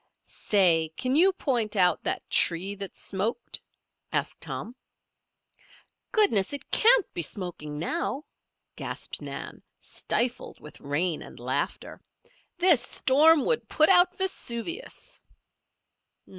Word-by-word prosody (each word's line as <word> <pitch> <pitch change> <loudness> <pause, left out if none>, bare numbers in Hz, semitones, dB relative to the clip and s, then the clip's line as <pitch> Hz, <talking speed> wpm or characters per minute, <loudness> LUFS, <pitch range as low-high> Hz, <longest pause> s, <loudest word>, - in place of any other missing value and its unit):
"Say! 170 -6 +2
Can 255 +1 -1
you 365 +5 +5
point 245 - -1
out 180 -2 +3
that - - -2
tree 180 +4 +2
that 200 -1 -7
smoked?" 200 +4 -3 0.5
asked - - -3
Tom. 235 - -6 1.4
"Goodness! 260 - +3
It 285 - -7
can't 470 -2 +5
be 175 - -3
smoking 160 -3 -4
now," 295 - -3 0.5
gasped - - -6
Nan, - - -8 0.2
stifled 245 +1 -3
with 150 - -13
rain 155 +4 -1
and - - -12
laughter. 130 +4 -4 0.6
"This 350 -7 +4
storm 290 +5 +3
would 475 - -1
put 310 0 +3
out 360 -1 +4
Vesuvius." 350 - -4
235 Hz, 110 wpm, -26 LUFS, -, 1.4 s, you